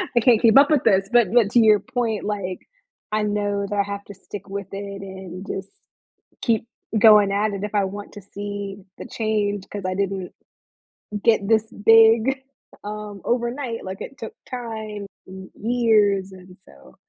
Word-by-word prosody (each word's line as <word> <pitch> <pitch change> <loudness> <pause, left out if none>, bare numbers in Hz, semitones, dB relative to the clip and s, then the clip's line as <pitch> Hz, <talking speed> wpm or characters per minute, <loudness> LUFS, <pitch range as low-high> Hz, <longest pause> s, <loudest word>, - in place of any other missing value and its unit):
I - - +6
can't 230 -1 +4
keep 230 +3 +6
up 285 +2 +7
with 300 -4 +3
this. 195 -3 +3
But 235 -5 +4
but 220 -4 +4
to 240 - +5
your 215 -2 +6
point, 230 -4 -2
like, 200 -3 -3 0.5
I 215 0 0
know 205 -1 -1
that 205 - -2
I 200 - +3
have 200 0 -6
to 205 - -10
stick 195 +1 -10
with 200 -1 -5
it 200 0 -6
and 190 -1 -8
just 195 0 -5 0.7
keep 225 -1 +1 0.3
going 210 -2 +7
at 205 +1 +1
it 200 0 -5
if 210 - -5
I 200 -1 +3
want 205 +2 -7
to 205 - -10
see 200 -1 -5 0.2
the - - -7
change 205 -3 -2
'cause 205 -2 -5
I 185 - -1
didn't 195 -2 -3 0.9
get 220 -4 +3
this 220 0 +2
big, 225 +4 +6 0.4
um, 210 -1 -7
overnight 240 0 -2
like 190 +1 -7
it 275 - -8
took 445 - -7 0.2
time 220 -4 -6 0.2
and 190 0 -10
years, 210 -4 +2
and 185 0 -14
so 65 -2 -18
205 Hz, 175 wpm, -22 LUFS, 195-225 Hz, 0.9 s, up